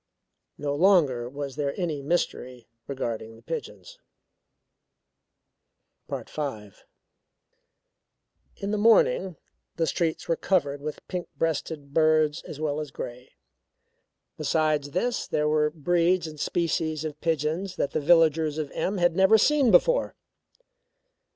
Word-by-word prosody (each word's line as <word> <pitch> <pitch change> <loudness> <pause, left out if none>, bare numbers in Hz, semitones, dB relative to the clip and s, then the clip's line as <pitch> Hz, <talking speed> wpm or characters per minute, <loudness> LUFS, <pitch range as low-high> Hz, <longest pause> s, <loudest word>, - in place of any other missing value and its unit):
No 145 -1 -2
longer 145 -8 +3
was 140 0 -6
there 140 +1 -2
any 160 -6 -2
mystery 130 -6 -2 0.2
regarding 115 -4 -4
the - - -18
pigeons. - - -7 2.1
V - - -2 2.4
In 200 +1 -4
the 215 - 0
morning 190 - +4 0.4
the 165 - +1
streets 160 0 -1
were 165 - +2
covered 145 -6 0
with 150 +1 -7
pink 180 -2 -4
breasted 155 -3 -3
birds 155 0 +3
as 150 - -9
well 150 -1 -1
as 150 -1 -5
grey. 125 -1 -8 1.0
Besides 155 -2 0
this, 230 - -1
there 150 0 0
were 150 0 +2
breeds 170 +3 +1
and 155 -1 -8
species 160 -1 -1
of 150 -1 -6
pigeons 165 +4 -1
that 140 - -1
the 155 - -1
villagers 160 -1 +3
of 150 -3 -3
M 200 +2 -2
had 175 -2 +2
never 190 +3 +6
seen 275 +3 +3
before. - - +3
155 Hz, 120 wpm, -26 LUFS, 145-175 Hz, 2.4 s, never